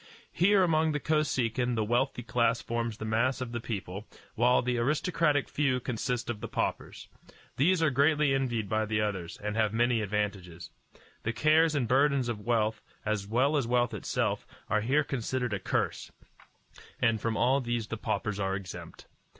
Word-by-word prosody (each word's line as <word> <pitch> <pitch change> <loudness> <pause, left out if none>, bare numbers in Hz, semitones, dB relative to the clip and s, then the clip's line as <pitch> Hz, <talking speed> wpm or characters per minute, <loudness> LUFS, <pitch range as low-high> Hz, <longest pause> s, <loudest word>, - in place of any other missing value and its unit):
Here 195 +2 +4
among 160 -2 +2
the 150 - -1
Kosekin 125 -6 0
the 110 - +1
wealthy 120 +3 0
class 115 +1 +1
forms 115 -2 -3
the 110 - -5
mass 115 +5 +1
of 125 -2 -4
the 120 - -3
people, 100 -2 -5 0.3
while 125 +2 +3
the 125 -1 0
aristocratic 150 +2 +1
few 135 -3 0
consist 125 0 -3
of 120 -3 -3
the - - -4
paupers. - - -3 0.5
These 165 +5 +3
are 155 - +3
greatly 145 +1 +3
envied 120 -6 -1
by 110 +1 0
the 105 0 0
others, 95 -5 -3
and 105 0 -2
have 110 -1 +1
many 120 -1 +2
advantages. 100 -5 -3 0.5
The 115 - -2
cares 155 +4 +3
and 130 -5 0
burdens 135 0 +2
of 115 -3 -3
wealth, 110 -1 0 0.2
as 105 -2 -1
well 130 +7 +2
as 140 -5 +1
wealth 120 0 +1
itself, 105 - -2 0.2
are 105 - +3
here 135 +7 +2
considered 125 -3 -2
a 100 - -1
curse, - - -2 0.9
and 115 -2 +2
from 115 0 -1
all 135 +2 +3
these 120 -2 -2
the 115 - -5
paupers 105 -1 -2
are 95 -1 0
exempt. 95 -2 -8
120 Hz, 175 wpm, -29 LUFS, 110-135 Hz, 0.9 s, Here